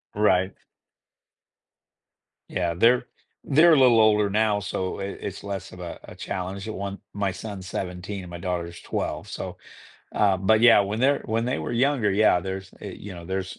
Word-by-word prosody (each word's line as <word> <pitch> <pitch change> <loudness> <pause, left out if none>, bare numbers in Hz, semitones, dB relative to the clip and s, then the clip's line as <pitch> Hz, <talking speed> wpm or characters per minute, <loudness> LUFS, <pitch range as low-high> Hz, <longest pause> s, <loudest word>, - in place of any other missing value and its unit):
Right. 95 -2 +2 2.0
Yeah, 85 -2 -1
they're 115 +8 +3 0.4
they're 160 +4 +6
a 150 - +5
little 125 -3 +6
older 105 -2 +4
now, 105 0 +2
so 95 -2 -3
it 100 0 -5
it's 100 - -6
less 100 -1 -5
of 90 - -12
a 85 -1 -7
a - - -11
challenge, 95 +2 -5
I 110 - -3
want 100 -1 -5
my 100 -1 -1
son's 95 0 -7
17 90 +2 -5
and 90 - -10
my 85 0 -7
daughter's 85 -1 -4
12, - - -3
so, - - -6 0.6
uh 100 -2 +3
but 110 +4 +3
yeah, 115 -2 +7
when 100 +2 -2
they're 140 +2 +3
when 115 +1 -1
they 125 +2 -1
were - - -4
younger, 125 -3 +2
yeah, 100 -2 +4
there's, 95 +1 -6
eh - - -7
you 100 -2 -8
know, 85 -1 -9
there's 95 +1 -4
100 Hz, 180 wpm, -25 LUFS, 95-110 Hz, 2.0 s, yeah